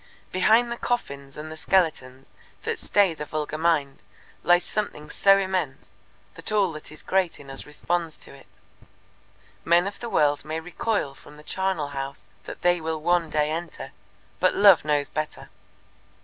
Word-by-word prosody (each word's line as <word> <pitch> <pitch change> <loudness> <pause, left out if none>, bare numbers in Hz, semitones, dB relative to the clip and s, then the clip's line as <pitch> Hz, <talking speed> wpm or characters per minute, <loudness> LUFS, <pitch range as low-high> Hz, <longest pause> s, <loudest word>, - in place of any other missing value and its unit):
Behind 225 +6 +4
the 235 - -3
coffins 140 - -3
and 155 +1 -7
the - - -6
skeletons 155 -7 0 0.4
that - - -2
stay 200 -4 +3
the 150 - -6
vulgar 155 0 -4
mind 150 -5 +1 0.4
lies 175 0 +4
something 150 -8 -3
so 195 0 +5
immense 185 -8 -2 0.4
that - - -5
all 200 -4 +3
that 155 -1 -8
is 155 - -7
great 185 -2 0
in 140 -1 -11
us 135 - -8
responds 165 +2 -1
to - - -10
it. - - -16 1.2
Men 170 +2 +4
of 200 0 -5
the 235 - -5
world 145 -5 +2
may 155 +2 -3
recoil 180 -2 -2
from 145 +2 -15
the 150 - -14
charnel 185 -2 -1
house 135 -1 -6 0.2
that - - -9
they 175 -1 +3
will 160 0 -2
one 175 +1 +1
day 150 0 +1
enter, 165 +2 -5 0.5
but - - +3
Love 200 -4 +7
knows 145 -1 +1
better. 155 -1 -4
160 Hz, 165 wpm, -25 LUFS, 150-185 Hz, 1.2 s, Love